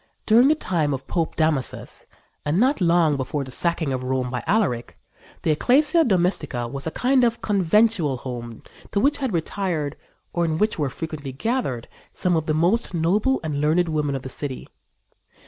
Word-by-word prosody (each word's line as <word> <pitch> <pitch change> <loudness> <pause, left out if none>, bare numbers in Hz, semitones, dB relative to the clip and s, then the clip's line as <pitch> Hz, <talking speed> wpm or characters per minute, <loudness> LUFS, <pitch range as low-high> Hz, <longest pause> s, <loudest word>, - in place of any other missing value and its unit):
During 235 +4 +6
the 305 - +4
time 160 - 0
of 135 0 -9
Pope 165 +1 -2
Damasus, 155 -5 -1 0.4
and 150 +5 +1
not 260 +1 +2
long 170 -4 +3
before 140 +2 -2
the 130 - -9
sacking 165 -1 0
of 130 - -2
Rome 130 -1 -1
by 125 - -3
Alaric, 170 - 0 0.5
the 160 - +2
Ecclesia 295 - +3
Domestica 175 - 0
was 140 +5 -5
a 160 - -5
kind 255 +1 +3
of 235 -1 +1
conventual 200 - +2
home 120 -2 -7 0.3
to 200 - 0
which 280 +6 +2
had 265 -4 -2
retired, 165 -4 -2 0.4
or 175 - +1
in 160 -2 0
which 215 -1 0
were 145 -3 0
frequently 150 -1 -6
gathered, 135 - -2 0.3
some 180 -1 +1
of 160 -1 -1
the 155 - +1
most 180 +5 +1
noble 200 +11 +2
and 150 -2 -2
learned 165 +3 +2
women 150 -3 0
of 135 - -5
the - - -6
city. 135 -1 -6
160 Hz, 180 wpm, -23 LUFS, 140-205 Hz, 0.5 s, During